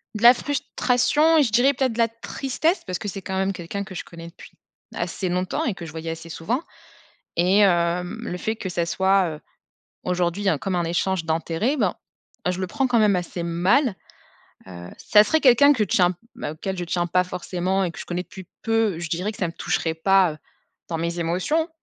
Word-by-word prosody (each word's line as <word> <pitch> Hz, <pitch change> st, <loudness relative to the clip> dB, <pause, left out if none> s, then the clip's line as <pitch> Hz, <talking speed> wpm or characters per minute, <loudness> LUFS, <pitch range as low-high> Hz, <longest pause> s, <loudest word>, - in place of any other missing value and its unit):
De 215 Hz, -, -4 dB
la 240 Hz, +1 st, +10 dB
frustration 290 Hz, +3 st, +1 dB
et 300 Hz, -, +6 dB
je 230 Hz, -, -1 dB
dirais, 255 Hz, +5 st, +4 dB
peut-être, 260 Hz, -1 st, 0 dB
de 225 Hz, -, -8 dB
la 230 Hz, -1 st, +4 dB
tristesse 270 Hz, -, -2 dB
parce 180 Hz, -, -2 dB
que 205 Hz, -, -4 dB
c'est 195 Hz, 0 st, -6 dB
quand 190 Hz, +1 st, -4 dB
même 190 Hz, +1 st, +1 dB
quelqu'un 185 Hz, +2 st, -5 dB
que 190 Hz, -1 st, -10 dB
je -, -, -6 dB
connais 170 Hz, -1 st, -10 dB
depuis 170 Hz, -, -14 dB, 0.4 s
assez 190 Hz, -, -3 dB
longtemps 185 Hz, -, -1 dB
et 230 Hz, -, 0 dB
que 175 Hz, -3 st, -9 dB
je 160 Hz, -, -8 dB
voyais 165 Hz, 0 st, -6 dB
assez 165 Hz, +1 st, -8 dB
souvent 220 Hz, -, -2 dB, 0.7 s
et 180 Hz, +4 st, +3 dB
hem, 175 Hz, +1 st, +2 dB
le 180 Hz, -6 st, -4 dB
fait 220 Hz, +4 st, -2 dB
que 190 Hz, -4 st, -5 dB
ça 170 Hz, -1 st, -1 dB
soit, 190 Hz, +2 st, +2 dB
heu, 150 Hz, -, -7 dB, 0.6 s
aujourd'hui 180 Hz, +2 st, -1 dB
il -, -, -5 dB
y -, -, +4 dB
a 155 Hz, -, +1 dB
comme 190 Hz, -2 st, -2 dB
un 175 Hz, -, +1 dB
échange 175 Hz, +1 st, -1 dB
d'intérêts, 165 Hz, -, 0 dB
ben, 210 Hz, -9 st, 0 dB, 0.5 s
je 180 Hz, +1 st, -1 dB
le 185 Hz, -, -2 dB
prends 270 Hz, +8 st, -1 dB
quand 240 Hz, -2 st, +2 dB
même 210 Hz, -3 st, +4 dB
assez 175 Hz, 0 st, -3 dB
mal. 185 Hz, -, +2 dB, 0.7 s
Heu, 90 Hz, -1 st, -9 dB
ça 210 Hz, 0 st, +5 dB
serait 315 Hz, +9 st, +2 dB
quelqu'un 280 Hz, +2 st, +6 dB
que 240 Hz, -, -3 dB
je 200 Hz, -, -1 dB
tiens 180 Hz, -1 st, +3 dB, 0.2 s
auquel 180 Hz, +5 st, -4 dB
je 175 Hz, -, -2 dB
tiens 175 Hz, 0 st, -1 dB
pas 180 Hz, +2 st, +2 dB
forcément 180 Hz, +1 st, -2 dB
et 175 Hz, -, -1 dB
que 160 Hz, -, -12 dB
je -, -, -6 dB
connais 175 Hz, 0 st, -2 dB
depuis 190 Hz, -2 st, -12 dB, 0.2 s
peu, 225 Hz, -6 st, +1 dB
je 170 Hz, -2 st, -5 dB
dirais 185 Hz, +6 st, -1 dB
que -, -, -14 dB
ça 185 Hz, -, 0 dB
ne -, -, -7 dB
me -, -, -36 dB
toucherait 160 Hz, -1 st, -1 dB
pas, 185 Hz, -1 st, +3 dB
heu, -, -, -13 dB, 0.5 s
dans 165 Hz, -1 st, -3 dB
mes 170 Hz, +1 st, -2 dB
émotions. 185 Hz, -, 0 dB
185 Hz, 225 wpm, -23 LUFS, 170-225 Hz, 0.7 s, la